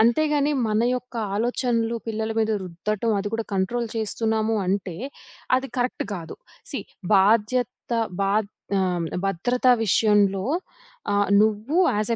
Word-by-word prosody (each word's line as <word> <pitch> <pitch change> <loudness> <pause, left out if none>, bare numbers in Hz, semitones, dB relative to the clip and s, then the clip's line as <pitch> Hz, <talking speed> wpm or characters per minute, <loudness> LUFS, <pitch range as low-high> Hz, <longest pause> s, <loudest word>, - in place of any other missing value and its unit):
అంతేగాని 290 +5 +3 0.2
మన 215 +1 +1
యొక్క 250 0 -6 0.2
ఆలోచనలు 235 +1 0
పిల్లల 220 0 -2
మీద 220 0 +2
రుద్దటం, 205 +6 -2
అది 200 +1 -2
కూడా 225 0 -1
కంట్రోల్ 230 +5 0
చేస్తున్నాము 220 0 0
అంటే 185 -2 -1 0.6
అది 265 +1 -2
కరెక్ట్ 250 0 -1
కాదు. 170 -4 -7 0.4
సీ - - -2 0.4
బాధ్యత, 215 +5 +3 0.5
బా 195 0 +1 0.5
ఆహ్, 180 -3 0 0.2
భద్రత 195 +7 0 0.2
విషయంలో 205 -2 +3 0.7
ఆహ్, 205 0 +2
నువ్వు 220 +7 +1 0.2
యాస్ 210 +2 0
220 Hz, 120 wpm, -24 LUFS, 195-235 Hz, 0.7 s, అంతేగాని